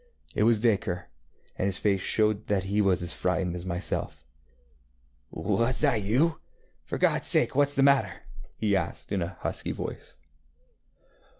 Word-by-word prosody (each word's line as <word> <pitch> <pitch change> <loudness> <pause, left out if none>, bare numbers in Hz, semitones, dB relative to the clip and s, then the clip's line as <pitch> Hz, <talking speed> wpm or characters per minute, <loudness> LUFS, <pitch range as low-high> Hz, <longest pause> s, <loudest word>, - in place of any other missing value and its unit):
It 105 - +2
was 115 -2 +4
Dacre, 100 -6 0 0.5
and 95 - +1
his 95 -2 0
face 100 -2 +1
showed 110 0 +1
that 100 -2 +1
he 100 +2 0
was 95 -3 +2
as 85 - 0
frightened 90 -1 -1
as 90 +1 -6
myself. 85 -7 -3 1.1
ŌĆ£Was 120 +3 0
that 115 -6 +2
you? 140 +11 +1 0.4
For - - -4
GodŌĆÖs - - +2
sake - - +4
whatŌĆÖs 145 +1 +2
the 135 - +3
matter? 140 -6 +5
ŌĆØ 95 - -14
he 105 -2 +1
asked 90 -4 -3
in 100 - 0
a 85 +1 -5
husky - - -2
voice. - - -7
100 Hz, 160 wpm, -27 LUFS, 95-115 Hz, 1.1 s, matter